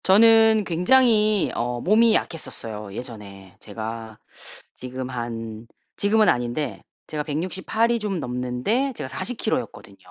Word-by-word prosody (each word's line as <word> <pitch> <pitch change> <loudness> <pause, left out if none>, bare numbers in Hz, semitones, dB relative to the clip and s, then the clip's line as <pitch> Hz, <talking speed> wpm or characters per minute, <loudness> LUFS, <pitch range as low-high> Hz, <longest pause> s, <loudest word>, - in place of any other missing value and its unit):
저는 220 +2 +6
굉장히 215 +3 +3
어 120 +1 -2
몸이 220 - +4
약했었어요 110 - -4
예전에. 100 -6 -9
제가 110 0 -7 0.6
지금 130 0 -6
한 115 -2 -6 0.3
지금은 215 +1 +3
아닌데 120 +4 -1 0.3
제가 150 -1 -3
168 185 +9 -1
이 235 - +1
좀 205 -4 -2
넘는데 125 - -1
제가 - - -5
40kg 220 - -1
였거든요. 100 - -11
150 Hz, 250 characters per minute, -23 LUFS, -, 0.6 s, 저는